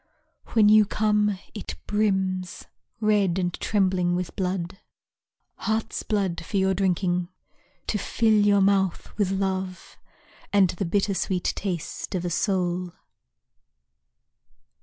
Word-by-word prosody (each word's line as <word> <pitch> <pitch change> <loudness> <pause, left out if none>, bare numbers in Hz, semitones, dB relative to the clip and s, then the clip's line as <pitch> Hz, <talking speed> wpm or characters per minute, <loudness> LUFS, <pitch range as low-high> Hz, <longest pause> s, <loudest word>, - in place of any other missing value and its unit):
When 220 -2 +5
you 215 0 +7
come, 210 -1 +1 0.2
it 210 - -6
brims 190 -4 -1 0.3
Red 205 -5 +2
and 175 -2 -1
trembling 185 -4 +1
with 180 -1 -4
blood, 185 0 -3 0.8
Heart's 220 0 -2
blood 195 -6 -1
for 200 - -3
your 190 0 +2
drinking; 180 -2 0 0.6
To 210 - -1
fill 220 +2 +1
your 205 -1 +4
mouth 190 -2 +1
with 200 -3 +2
love 190 -1 -3 0.5
And 195 -3 +4
the 185 +2 -3
bitter 200 +3 +1
sweet 180 0 -1
taste 185 -2 -4
of 180 -1 -2
a 175 - -2
soul. 180 -1 -1
190 Hz, 115 wpm, -25 LUFS, 180-205 Hz, 0.8 s, you